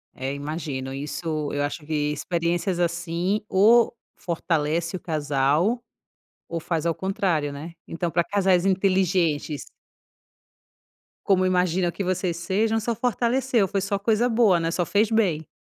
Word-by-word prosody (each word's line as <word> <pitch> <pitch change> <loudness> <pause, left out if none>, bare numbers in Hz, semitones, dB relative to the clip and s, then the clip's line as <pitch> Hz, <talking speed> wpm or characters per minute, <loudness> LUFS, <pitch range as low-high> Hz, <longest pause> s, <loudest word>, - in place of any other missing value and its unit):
É 135 +1 -3
imagino, 140 -2 -4
isso, 150 +2 -3
eu 145 - 0
acho 150 +2 -4
que 150 -1 -1
experiências 170 +3 -1
assim 170 +3 -1
ou 230 +5 +5 0.2
fortalece 165 0 -1
o - - -4
casal, 155 - +1 0.6
ou 170 - -3
faz 165 -1 -2
ao 170 - +2
contrário, 180 -6 -1
né. 155 +4 -8
Então 170 0 -3
para 170 0 +2
casais 190 -2 +2
inteligentes 185 -6 +1 1.6
como 185 -2 +3
imagino 180 -1 +1
que 200 - -4
vocês 180 -2 -1
sejam, 215 +6 0
só 230 +1 -2
fortaleceu, 245 -1 +1
foi 195 +1 -1
só 200 +1 -1
coisa 225 +4 +2
boa, 220 -7 +4
né, 165 0 -1
só 175 +1 0
fez 210 +5 +2
bem. 180 -9 +1
175 Hz, 140 wpm, -24 LUFS, 155-195 Hz, 1.6 s, ou